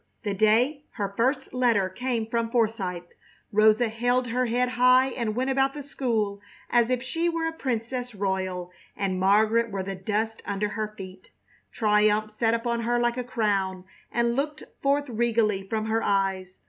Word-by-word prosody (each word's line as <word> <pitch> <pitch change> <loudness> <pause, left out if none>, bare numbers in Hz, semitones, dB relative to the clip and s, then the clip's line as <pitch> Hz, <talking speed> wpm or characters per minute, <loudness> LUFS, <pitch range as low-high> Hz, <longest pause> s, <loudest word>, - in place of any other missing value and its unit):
The 205 -3 -1
day 230 +8 +2
her 200 -1 -3
first 260 +4 0
letter 235 -6 +2
came 235 +3 -2
from 230 0 -1
Forsythe, 215 -7 0 0.5
Rosa 215 +2 +4
held 245 +2 0
her 250 +2 0
head 245 +2 +1
high 255 +1 +4
and 230 -5 -3
went 260 +2 0
about 270 +1 +1
the 290 - -6
school 220 -7 -2 0.3
as 240 -1 +4
if 250 -1 0
she 330 +7 -1
were 330 -1 -1
a 325 - -2
princess 245 -3 -3
royal 185 -2 -2 0.3
and 190 -2 -1
Margaret 215 +4 +3
were 195 -2 -3
the 195 +1 -4
dust 215 +4 -2
under 205 +1 -2
her 215 0 -4
feet. 185 -1 -10 0.4
Triumph 215 0 +2
sat 225 +1 +1
upon 235 0 -1
her 240 +1 +1
like 240 0 +1
a 250 - -1
crown 200 -6 -1 0.3
and 235 0 +1
looked 295 +3 -2 0.2
forth 285 +1 +1
regally 220 -4 0
from 220 -1 -1
her 220 +1 0
eyes. 190 -2 -1
225 Hz, 170 wpm, -26 LUFS, 205-250 Hz, 0.5 s, Rosa